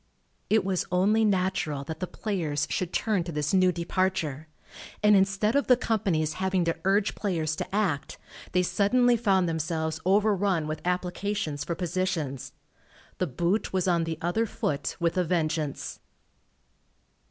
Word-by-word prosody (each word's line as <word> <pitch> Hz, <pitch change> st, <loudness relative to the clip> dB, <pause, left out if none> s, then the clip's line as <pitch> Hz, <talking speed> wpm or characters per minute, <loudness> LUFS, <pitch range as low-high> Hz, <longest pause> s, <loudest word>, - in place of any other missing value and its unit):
It 220 Hz, -2 st, +3 dB
was 190 Hz, -2 st, -1 dB
only 205 Hz, +5 st, +3 dB
natural 185 Hz, -8 st, 0 dB
that 160 Hz, +3 st, -6 dB
the 185 Hz, -, -3 dB
players 165 Hz, -10 st, -2 dB
should 185 Hz, -2 st, -1 dB
turn 210 Hz, -6 st, 0 dB
to 170 Hz, -, -6 dB
this 150 Hz, +1 st, -1 dB
new 185 Hz, -1 st, +5 dB
departure, 170 Hz, -4 st, -1 dB, 0.6 s
and 210 Hz, 0 st, +6 dB
instead 200 Hz, +3 st, +2 dB
of 285 Hz, -, +2 dB
the 250 Hz, -, +6 dB
companies 185 Hz, -10 st, 0 dB
having 190 Hz, -2 st, +1 dB
to 165 Hz, -, 0 dB
urge 195 Hz, +1 st, +2 dB
players 160 Hz, -6 st, -1 dB
to -, -, -4 dB
act, 180 Hz, -10 st, -1 dB, 0.3 s
they 180 Hz, 0 st, +2 dB
suddenly 245 Hz, +6 st, +3 dB
found 195 Hz, -6 st, +2 dB
themselves 160 Hz, -1 st, -2 dB
overrun 195 Hz, -3 st, +2 dB
with 155 Hz, 0 st, -4 dB
applications 180 Hz, -3 st, -2 dB
for 170 Hz, -, -3 dB
positions. 175 Hz, -6 st, -2 dB, 0.7 s
The 185 Hz, -, +1 dB
boot 175 Hz, -, -1 dB
was 185 Hz, -1 st, +1 dB
on 170 Hz, -2 st, +2 dB
the 165 Hz, -1 st, -3 dB
other 220 Hz, +7 st, +1 dB
foot 145 Hz, -7 st, -3 dB
with 170 Hz, +1 st, +1 dB
a -, -, +3 dB
vengeance. 155 Hz, -4 st, -2 dB
180 Hz, 150 wpm, -27 LUFS, 160-200 Hz, 0.7 s, and